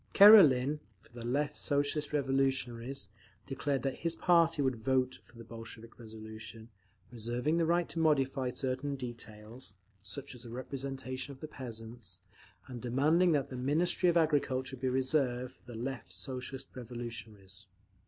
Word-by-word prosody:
Karelin, 150 -10 +8 0.2
for 110 +4 -24
the 120 -1 -8
Left 145 +5 0
Socialist 145 +1 0
Revolutionaries, 135 -4 0 0.4
declared 135 0 -1
that 135 -1 -1
his 165 0 -1
party 165 -2 +4
would 130 -3 +1
vote 130 0 +1
for 120 - -19
the 115 - -9
Bolshevik 115 0 -10
resolution, 110 0 -9 0.4
reserving 120 +7 -1
the 165 -1 +2
right 175 0 +2
to 165 - -3
modify 135 -4 +2
certain 130 +2 -2
details, 120 -2 -8 0.3
such 130 +9 -6
as 125 - -12
the 120 - -10
representation 130 +2 -5
of 130 - -15
the 155 - -6
peasants, 115 - -8 0.4
and 125 -2 -8
demanding 155 +9 +3
that 140 -2 0
the - - -4
Ministry 165 +7 +3
of 170 - +3
Agriculture 135 -4 +1
be 130 0 -1
reserved 130 -1 0
for 120 -2 -15
the 115 - -7
Left 120 -6 -5
Socialist 130 +7 -6
Revolutionaries. 115 -6 -7
130 Hz, 145 wpm, -32 LUFS, 120-145 Hz, 0.4 s, Karelin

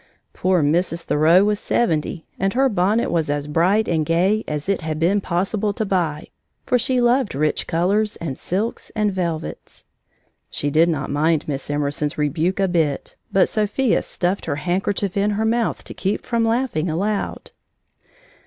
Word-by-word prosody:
Poor 185 -3 +1
Mrs. 165 +3 +1
Thoreau 165 +6 +4
was 210 0 +1
seventy, 165 -6 -1
and 195 +1 0
her 270 +1 +4
bonnet 205 +2 +1
was 160 -3 0
as 145 0 -1
bright 175 +8 +2
and 160 -2 +1
gay 180 +7 +2
as 150 +1 -4
it 195 -2 0
had 155 -1 -3
been 190 +5 +2
possible 195 +4 -1
to 220 - -2
buy, 170 -6 -1 0.4
for 250 - +2
she 255 +2 +1
loved 240 - +2
rich 150 +2 0
colors 200 +6 +1
and 145 -6 -5
silks 205 +6 -3
and 210 -2 +1
velvets. 170 -4 -4 0.6
She 145 - -1
did 165 +4 +4
not 145 -4 -2
mind 155 +2 +1
Miss 140 -2 -4
Emerson's 145 0 -1
rebuke 160 +6 0
a 195 - +3
bit, 160 -6 -1 0.2
but 190 - +4
Sophia 215 +3 +1
stuffed 180 +2 -2
her - - 0
handkerchief 185 +4 -1
in 200 +1 +2
her 220 - 0
mouth 230 0 0
to - - -8
keep 195 +2 -2
from 235 -1 0
laughing 225 -8 0
aloud. 200 +6 -2
180 Hz, 165 wpm, -21 LUFS, 155-210 Hz, 0.6 s, Thoreau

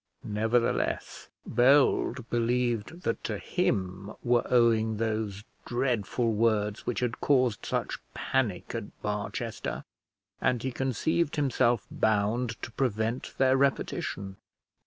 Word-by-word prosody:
Nevertheless 110 +3 0 0.2
Bold 130 -1 +3
believed 120 +5 0
that 115 - -1
to - - -2
him 95 +1 -1
were 120 -1 +3
owing 115 -3 +3
those 110 -2 -2 0.2
dreadful 120 -2 0
words 105 -2 +1
which 120 - -1
had 120 -1 -2
caused 125 -6 +2
such - - -2 0.2
panic 115 -9 -1
at - - -6
Barchester, 105 0 -3 0.6
and 125 -2 +1
he 130 - -1
conceived 135 +6 0
himself 120 -6 +2
bound 110 +3 +1
to - - -5
prevent 115 -1 -1
their 130 0 +4
repetition. 100 -7 -1
115 Hz, 110 wpm, -29 LUFS, 105-125 Hz, 0.6 s, their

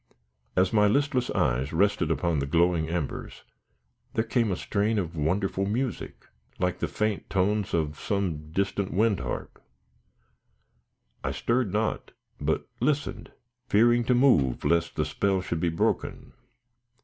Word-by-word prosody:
As 95 +2 +3
my 105 -1 +5
listless 130 +2 +1
eyes 65 +4 0
rested 95 -1 +2
upon 80 -1 +1
the 70 - -2
glowing 85 +1 +2
embers, 85 -4 -4 0.7
there 110 - +2
came 115 -2 +1
a - - +1
strain 105 +4 0
of 85 -4 -2
wonderful 95 +5 0
music, 115 +1 -3 0.3
like 90 -1 -1
the - - -1
faint 105 -2 -2
tones 100 +1 +1
of 75 -2 -1
some 85 -7 -2
distant 100 +2 -1
wind 105 0 +2
harp. - - -6 1.6
I - - -1
stirred 120 -4 0
not, 110 +2 -2 0.3
but - - -1
listened, 145 -1 -1 0.4
fearing 120 +3 +4
to 125 - +3
move 80 - +3
lest 85 0 +1
the 75 - 0
spell 95 +5 0
should 85 -2 -3
be 85 0 +1
broken. 80 - -1
95 Hz, 135 wpm, -27 LUFS, 85-110 Hz, 1.6 s, my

